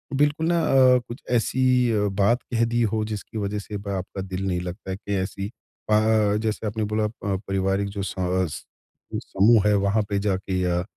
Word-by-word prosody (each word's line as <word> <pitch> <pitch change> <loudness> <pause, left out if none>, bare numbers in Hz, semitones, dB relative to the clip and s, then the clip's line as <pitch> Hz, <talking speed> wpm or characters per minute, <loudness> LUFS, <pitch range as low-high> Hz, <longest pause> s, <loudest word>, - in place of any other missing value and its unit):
बिल्कुल 150 +3 +2
ना 170 0 +2
अ, 130 -1 +6
कुछ 120 +3 -8
ऐसी 125 +1 +2
अ, 105 -2 +1
बात 115 +5 +3
कह 115 0 +3
दी 120 +1 0
हो, 110 -1 +1
जिसकी 110 +1 -6
वजह 105 0 -2
से 105 +1 -7
अब 100 0 -6
आपका 95 0 -4
दिल 95 0 -4
नहीं 90 -2 0
लगता 90 +2 -6
है 95 - -3
कि 100 -1 -5
ऐसी 95 +1 -3 0.4
अ, 110 -1 +3
जैसे 110 0 -2
आपने 110 +1 -2
बोला 105 0 0
प 100 -3 -3
पारिवारिक 95 +1 0
जो 100 0 -5
स - - -5
अस 90 -3 -1 0.5
जो - - -1
समूह 105 +1 +3
है, 105 - +4
वहाँ 100 +2 +2
पे 100 - 0
जाके 95 -2 -1
या 90 -1 0
105 Hz, 205 wpm, -24 LUFS, 95-115 Hz, 0.5 s, अ